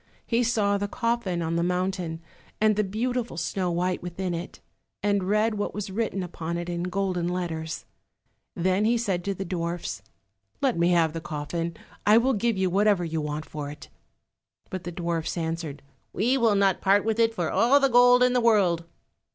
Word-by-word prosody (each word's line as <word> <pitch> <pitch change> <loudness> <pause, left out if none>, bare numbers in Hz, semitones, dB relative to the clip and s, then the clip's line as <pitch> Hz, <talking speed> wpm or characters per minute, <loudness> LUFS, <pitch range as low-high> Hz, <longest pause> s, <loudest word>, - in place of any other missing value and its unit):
He 235 0 +1
saw 210 -4 +1
the 205 - -1
coffin 220 -7 -1
on 165 +1 -1
the - - +1
mountain, 180 -2 -1 0.4
and 215 0 +4
the 210 - +2
beautiful 230 +1 -2
Snow 180 +2 -1
white 180 +1 -1
within 180 +1 -3
it, 170 +2 -6 0.4
and 200 -2 +1
read 215 +1 +2
what 205 - -2
was 205 -1 -4
written 200 -2 -1
upon 170 -1 -4
it 175 0 -4
in 170 0 -2
golden 180 -1 -1
letters. 165 -3 -3 0.7
Then 185 +3 +1
he 235 +2 +3
said 195 -7 -1
to 200 -1 -1
the 195 - -4
dwarfs, 170 - -3 0.6
"Let 265 -4 +1
me 170 +1 +2
have 165 -3 +3
the 165 - -4
coffin, 160 +2 -4 0.3
I 210 +2 +6
will 260 +3 +3
give 230 0 0
you 190 0 +2
whatever 195 0 +2
you 160 -1 -2
want 150 +1 -4
for 150 -2 -6
it." 145 0 -10 0.8
But 185 -2 -5
the 175 - -4
dwarfs 170 -1 -2
answered, 160 -3 -4 0.3
"We 240 +7 +2
will 230 -5 +3
not 195 -2 +2
part 200 +2 +3
with 225 0 0
it 225 0 +3
for 170 -6 -1
all 255 +5 +5
the 275 - +4
gold 245 0 +6
in 250 0 +3
the 250 - +3
world." 190 -8 +3
185 Hz, 190 wpm, -26 LUFS, 170-215 Hz, 0.8 s, I